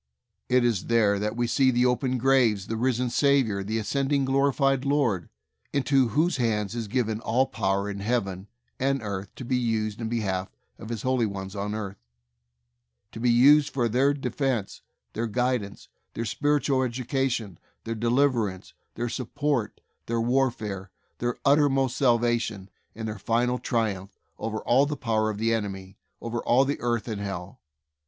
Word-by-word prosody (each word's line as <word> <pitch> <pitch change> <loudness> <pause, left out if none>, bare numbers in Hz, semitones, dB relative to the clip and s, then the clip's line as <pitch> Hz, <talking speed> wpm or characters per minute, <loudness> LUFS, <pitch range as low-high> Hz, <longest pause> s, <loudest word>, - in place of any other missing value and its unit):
It 125 -1 +4
is 115 -6 0
there 105 -4 +3
that 105 +2 -2
we 120 0 0
see 130 +2 +3
the 125 0 +2
open 125 +1 +1
grave, 120 -6 +3
the 115 - -2
risen 125 +1 0
Saviour, 130 -9 +2
the 110 +3 -2
ascending, 135 +5 0
glorified 135 0 +2
Lord, 135 - +1 0.4
into 135 -2 +3
whose 155 - +1
hands 110 -4 0
is 115 -2 -4
given 110 -1 -1
all 120 +3 +1
power 100 -4 -1
in 100 -1 -5
Heaven 100 -3 -2 0.3
and 135 -1 0
earth 100 -2 -4
to 130 - -8
be 125 +1 +1
used 110 -2 -1
in 110 - -2
behalf 95 -5 -2 0.3
of 110 - -9
His 115 -3 -4
holy 130 -3 +1
ones 95 0 -6
on 100 +1 -3
earth; 100 -2 -5 1.1
to - - -8
be 120 +1 +2
used 140 +5 +6
for 120 -3 +1
their 130 +5 +3
de 140 - -4
fense, 130 -8 -2 0.3
their 115 +2 -2
guidance, 125 -3 -2 0.3
their 115 - -2
spiritual 145 +3 +1
educa 130 +2 0
tion, 105 -8 -4 0.2
their 115 - -3
deliverance, 115 -4 0 0.2
their 120 +1 -2
support, 130 0 -2 0.3
their 115 0 0
warfare, 115 -6 0 0.3
their 120 0 -1
uttermost 135 -3 +3
salvation, 120 -6 +1 0.2
and 110 +1 -5
their 110 -1 -5
final 120 +4 +1
triumph 105 -5 -2 0.2
over 110 0 -3
all 135 +4 +3
the 150 0 -3
power 110 -3 0
of 105 - -4
the 115 +2 +1
enemy, 95 -3 -4 0.3
over 115 0 -3
all 130 +4 +3
earth 120 -1 -1
and 105 -3 -4
Hell. 95 -3 -6
115 Hz, 160 wpm, -26 LUFS, 105-130 Hz, 1.1 s, used